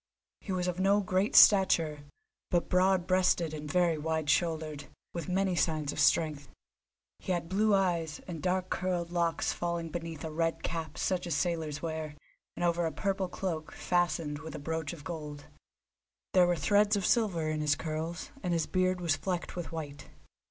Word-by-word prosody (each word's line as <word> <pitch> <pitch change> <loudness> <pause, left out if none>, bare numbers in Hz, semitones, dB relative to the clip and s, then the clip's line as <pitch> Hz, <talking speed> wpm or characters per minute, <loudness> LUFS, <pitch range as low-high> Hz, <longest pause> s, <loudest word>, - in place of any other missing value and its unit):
He 200 - -7
was 180 -1 -1
of 180 0 -2
no 195 +2 +4
great 190 +1 0
stature, 165 -7 +6 0.4
but 175 -1 +1
broad 185 0 +3
breasted 185 -3 +2
and 150 -1 -5
very 175 -3 +2
wide 160 -1 0
shouldered, 155 -4 -1 0.3
with 170 +1 -5
many 190 0 +1
signs 155 -4 0
of - - -6
strength. 150 -4 +2 0.7
He - - -4
had 170 -1 -2
blue 205 +3 +3
eyes, 170 -5 0
and 165 -4 -6
dark 185 0 -1
curled 175 -2 -1
locks 170 -1 0
falling 170 -1 -3
beneath 165 -2 -6
a 160 - -4
red 165 +1 -1
cap 160 -3 -4
such 180 -2 -1
as 170 - -1
sailors 160 -2 -2
wear, 160 -2 -4 0.4
and - - -2
over 170 -1 +2
a - - -3
purple 190 +5 -1
cloak, 165 -4 -4
fastened 170 -4 0
with 160 +1 -8
a 145 -1 -8
brooch 160 -2 -2
of 165 -4 -10
gold. 150 -2 -7 0.9
There 180 -1 +6
were 175 - +2
threads 205 +6 +3
of 200 -2 -1
silver 195 -9 +2
in 155 0 -2
his 150 -1 +2
curls, 160 - -4
and 180 - -1
his 165 -2 +1
beard 185 -1 0
was 165 -4 +2
flecked 180 +2 -3
with 175 -2 -5
white. 145 -3 -7
170 Hz, 180 wpm, -30 LUFS, 155-185 Hz, 0.9 s, stature